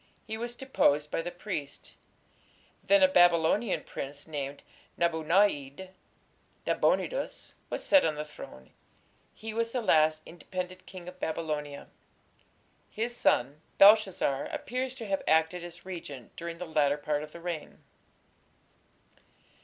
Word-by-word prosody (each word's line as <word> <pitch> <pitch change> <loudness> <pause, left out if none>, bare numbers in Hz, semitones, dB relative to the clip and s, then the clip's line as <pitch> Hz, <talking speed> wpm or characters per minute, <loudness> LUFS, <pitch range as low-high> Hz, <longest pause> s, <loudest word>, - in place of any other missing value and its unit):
He 220 - -4
was 240 +2 -4
deposed 150 - +1
by - - 0
the 175 - -4
priests. 175 -5 -6 0.9
Then 300 -1 +5
a - - +9
Babylonian 175 - +3
prince 140 +2 -7
named 145 -2 -5 0.3
Nabu 170 -2 +1
na´id 170 -2 +1 0.8
(Nabonidus) - - 0 0.2
was - - -3
set 290 -2 +5
on 155 - +1
the 150 +1 -4
throne. 65 - -12 0.6
He 220 0 -6
was 230 +1 -1
the 250 - 0
last 155 -4 +3
independent 185 +2 -7
king 180 -2 -10
of 180 0 -10
Babylonia. 150 -3 -3 1.0
His 235 +3 -3
son 140 - +1 0.2
Belshazzar 195 -9 +5
appears 255 +1 -3
to 235 - -7
have 195 -2 -1
acted 160 +2 +2
as 170 0 -10
regent 145 -9 -8
during 170 0 -6
the 180 - -5
latter 150 -3 +2
part 150 0 -1
of 150 0 -8
the 170 - -10
reign. 170 -3 -6
170 Hz, 130 wpm, -29 LUFS, 150-205 Hz, 1.0 s, a